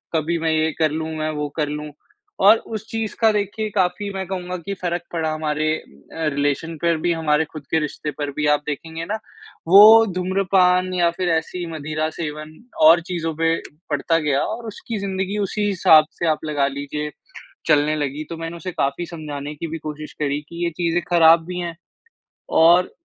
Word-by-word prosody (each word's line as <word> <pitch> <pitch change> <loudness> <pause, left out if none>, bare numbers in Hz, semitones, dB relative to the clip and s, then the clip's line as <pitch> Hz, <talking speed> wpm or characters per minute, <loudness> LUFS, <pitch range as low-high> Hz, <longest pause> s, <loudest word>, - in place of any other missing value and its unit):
कभी 160 +2 0
मैं 160 0 0
ये 160 0 +1
कर 155 -2 +3
लूँ 160 +1 -3
मैं 155 0 -1
वो 150 -1 -3
कर 150 -2 +1
लूँ 150 0 -5 0.6
और 215 +2 +8 0.2
उस 220 0 -6
चीज़ 225 -1 -3
का 225 -1 +5
देखिए 210 +1 -2
काफ़ी 190 +1 0
मैं 190 0 -3
कहूँगा 180 -1 -4
कि 195 +3 -5
फ़र्क 175 -1 -1
पड़ा 160 -2 -1
हमारे 155 0 -1
अ, - - -14 0.5
रिलेशन 145 +3 -1
पर 170 -1 +2
भी 170 +2 0
हमारे 160 -1 +1
ख़ुद 155 -3 -8
के 160 - +3
रिश्ते 150 0 -4
पर 145 -1 -2
भी 150 +2 -2
आप 150 0 +3
देखेंगे 160 +2 -5
ना, 205 - -2 0.5
वो 215 +5 +9
धूम्रपान 185 0 +2
या 175 -2 +3
फ़िर 180 +1 -2
ऐसी 170 +2 -1
मदिरा 155 +1 -2
सेवन 155 -1 -5 0.3
और 170 +1 +7
चीज़ों 165 -3 -2
पे 165 +1 +2 0.3
पड़ता 155 +3 +1
गया 145 -3 +1
और 230 +2 -4
उसकी 220 +1 -6
ज़िंदगी 195 +1 -2
उसी 205 +1 -1
हिसाब 180 -6 +6
से 170 - 0
आप 155 0 0
लगा 145 -2 +1
लीजिए 145 +2 -4 0.6
चलने 150 -1 +3
लगी। 145 0 -3
तो 165 - -6
मैंने 165 +1 -6
उसे 185 +2 -5
काफ़ी 140 +2 -1
समझाने 150 -3 -7
की 165 - -5
भी 165 +1 -5
कोशिश 155 0 -7
करी 145 -1 0
कि 170 +1 -5
ये - - +1
चीज़ें 175 0 +1
ख़राब 165 -1 +6
भी 180 +1 -5
हैं 170 -1 -4 0.9
और 175 +2 +5
165 Hz, 190 wpm, -21 LUFS, 150-180 Hz, 0.9 s, वो